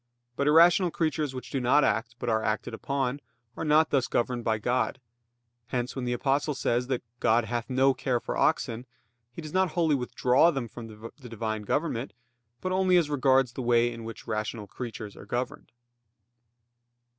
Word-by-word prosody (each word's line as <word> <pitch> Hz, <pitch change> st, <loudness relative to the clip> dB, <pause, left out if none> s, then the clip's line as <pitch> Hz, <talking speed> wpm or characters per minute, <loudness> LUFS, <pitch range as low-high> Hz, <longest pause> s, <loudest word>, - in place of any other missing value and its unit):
But 140 Hz, -, 0 dB
irrational 170 Hz, +4 st, +6 dB
creatures 155 Hz, -4 st, -1 dB
which 130 Hz, -, -7 dB
do 135 Hz, -, -1 dB
not 130 Hz, +4 st, +4 dB
act 115 Hz, +2 st, 0 dB
but -, -, -6 dB
are 110 Hz, -1 st, +2 dB
acted 110 Hz, +2 st, -2 dB
upon, 135 Hz, +3 st, -2 dB, 0.4 s
are -, -, -4 dB
not 155 Hz, 0 st, +3 dB
thus 135 Hz, -3 st, +2 dB
governed 120 Hz, 0 st, -1 dB
by 110 Hz, -1 st, +1 dB
God. 125 Hz, +4 st, -1 dB, 0.7 s
Hence, 125 Hz, 0 st, -3 dB
when 130 Hz, -2 st, -3 dB
the 120 Hz, -, 0 dB
Apostle 140 Hz, +4 st, 0 dB
says 125 Hz, -1 st, 0 dB
that 130 Hz, -2 st, -2 dB, 0.2 s
"God 115 Hz, +1 st, +3 dB
hath 120 Hz, +1 st, -3 dB
no 135 Hz, +1 st, +3 dB
care 130 Hz, -1 st, -1 dB
for -, -, -4 dB
oxen," 115 Hz, +3 st, 0 dB, 0.4 s
he 165 Hz, -, -9 dB
does 155 Hz, -, -8 dB
not 185 Hz, -3 st, +2 dB
wholly 165 Hz, -4 st, +2 dB
withdraw 130 Hz, +3 st, +3 dB
them 135 Hz, -7 st, -2 dB
from 115 Hz, +1 st, -9 dB
the 115 Hz, +4 st, -11 dB
Divine 110 Hz, -1 st, -3 dB
government, 130 Hz, +1 st, -2 dB, 0.5 s
but 185 Hz, -, -2 dB
only 185 Hz, -1 st, +3 dB
as 160 Hz, -4 st, +1 dB
regards 135 Hz, -3 st, +3 dB
the -, -, -5 dB
way 120 Hz, 0 st, +2 dB
in 115 Hz, -1 st, -8 dB
which 115 Hz, 0 st, -8 dB
rational 110 Hz, 0 st, -3 dB
creatures 110 Hz, -1 st, -7 dB
are -, -, -12 dB
governed. 125 Hz, +1 st, -4 dB
125 Hz, 180 wpm, -28 LUFS, 115-145 Hz, 0.7 s, irrational